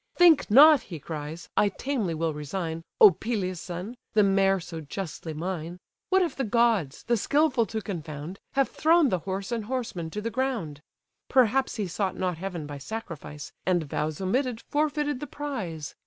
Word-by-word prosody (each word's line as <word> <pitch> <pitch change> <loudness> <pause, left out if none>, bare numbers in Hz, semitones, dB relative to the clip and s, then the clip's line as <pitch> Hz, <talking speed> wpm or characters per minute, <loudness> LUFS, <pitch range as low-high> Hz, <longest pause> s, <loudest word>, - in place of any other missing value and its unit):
"Think 340 -7 +6
not 290 +5 +8
(he 170 - -8
cries) 155 +2 -6
I 205 - +4
tamely 215 - -2
will 160 0 -1
resign, 160 +2 -4 0.2
O 205 - +10
Peleus' 185 -3 -3
son! 180 +7 -6 0.2
the 215 -1 +5
mare 195 0 +3
so 165 -2 -7
justly 160 +1 -6
mine. 170 +1 -4 0.3
What 380 0 +4
if 335 -6 -2
the 270 - -1
gods, 225 - +1
the 240 - +2
skilful 260 0 +2
to 220 -1 -4
confound, 160 -1 -6
Have 275 -1 +2
thrown 325 -2 +4
the 185 - 0
horse 195 +3 -3
and 230 -3 -2
horseman 225 -9 -3
to 210 - -5
the 230 +2 -3
ground? 230 - -2 0.5
Perhaps 260 +1 +3
he 215 -4 -1
sought 190 +1 -2
not 180 -3 -1
heaven 180 -4 -4
by 145 -1 -7
sacrifice, 150 -5 -7
And 180 -3 +2
vows 150 +1 -3
omitted 235 +5 0
forfeited 295 -2 0
the 295 - -6
prize. 200 - -5
195 Hz, 170 wpm, -27 LUFS, 165-250 Hz, 0.5 s, O